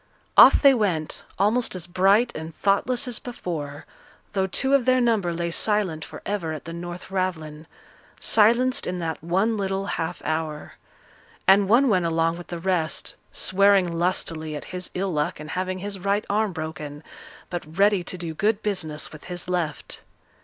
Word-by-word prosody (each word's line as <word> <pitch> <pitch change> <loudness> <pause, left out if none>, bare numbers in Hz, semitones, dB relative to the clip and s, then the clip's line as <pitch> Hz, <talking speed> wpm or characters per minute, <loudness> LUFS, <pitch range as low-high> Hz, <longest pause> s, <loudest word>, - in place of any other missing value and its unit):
Off - - +8
they 275 -1 +8
went, 185 -10 -1 0.2
almost 215 +3 +2
as 180 -3 -6
bright 195 +7 +3
and 160 0 -7
thoughtless 240 +6 +1
as 240 -3 -3
before, 155 - -6 0.5
though 190 -1 +1
two 265 +9 +1
of 275 -4 +4
their 255 0 +4
number 225 -7 +2
lay 170 0 -2
silent 190 -5 0
for - - -10
ever 185 -6 -2
at 155 - -8
the 165 - -6
North 175 +2 -7
Ravelin 160 -5 -3 0.5
silenced 240 +5 +3
in 180 - -2
that 165 -3 -4
one 195 +7 +1
little 195 -1 -2
half 170 -3 -3
hour. 155 -1 -3 0.7
And 195 0 +6
one 250 +5 +5
went 185 -7 +2
along 165 +1 +1
with 175 - -10
the 175 - -5
rest, 165 -4 -1 0.2
swearing 190 -3 +3
lustily 165 -3 -1
at 150 - -6
his 180 0 -2
ill 190 0 -1
luck 150 -1 -1
in 150 0 -8
having 185 0 -2
his 200 +1 -5
right 200 +3 0
arm 210 0 +1
broken, 155 -2 -6 0.5
but 165 -2 -6
ready 200 -2 +4
to 185 - -3
do 170 -2 -4
good 210 +5 0
business 160 -7 -3
with 155 - -12
his 180 0 -6
left. 175 -5 -2
180 Hz, 170 wpm, -24 LUFS, 165-205 Hz, 0.7 s, Off